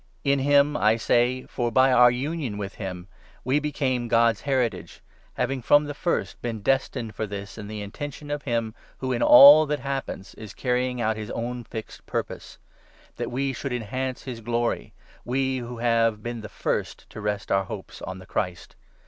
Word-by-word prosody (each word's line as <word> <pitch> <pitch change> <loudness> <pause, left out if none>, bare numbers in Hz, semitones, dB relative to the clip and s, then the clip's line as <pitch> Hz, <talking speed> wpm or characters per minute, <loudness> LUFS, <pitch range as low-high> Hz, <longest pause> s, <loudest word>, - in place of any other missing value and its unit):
In 140 -1 +2
him, 145 +2 +4
I 110 -5 +3
say, 120 +2 +2
for 120 -2 -2
by 130 +1 +5
u - - +4
our 125 0 +8
union 130 -2 -3
with 100 0 -5
him 90 -3 -6 0.4
we 130 +4 +2
became 135 -5 -1
God's 115 -1 +3
Heritage, 120 -11 -1 0.4
having 135 -1 -1
from 145 +5 +5
the 145 0 -5
first 170 +4 -2
been 115 -3 -4
destined 130 -3 0
for 110 - -3
this 100 0 -7
in 110 -2 -8
the 105 -1 -5
intention 145 +7 -7
of 145 0 -2
him 115 -4 -2 0.2
who, 130 -1 -3
in 120 - -2
all 145 +4 +9
that 150 0 -2
happens, 135 -8 -4
is 110 -3 -10
carrying 125 0 -1
out 110 -1 0
his 105 -1 -6
own 120 +1 -4
fixed 110 -1 -8
purpose; - - -5 0.6
that - - -3
we 135 +2 -1
should 135 +2 -5
enhance 130 +3 -3
his 125 -4 -7
glory 120 +1 -1 0.2
— - - -27
we 130 0 +1
who 120 0 -7
have 115 -2 +1
been 120 -1 -4
the' 105 - -8
first - - -3
12 - - -35
to 110 - -9
rest 105 +1 -3
our 95 0 +2
hopes - - -8
on 95 +1 -6
the 95 - -12
Christ. 90 -3 -4
120 Hz, 190 wpm, -25 LUFS, 110-135 Hz, 0.6 s, all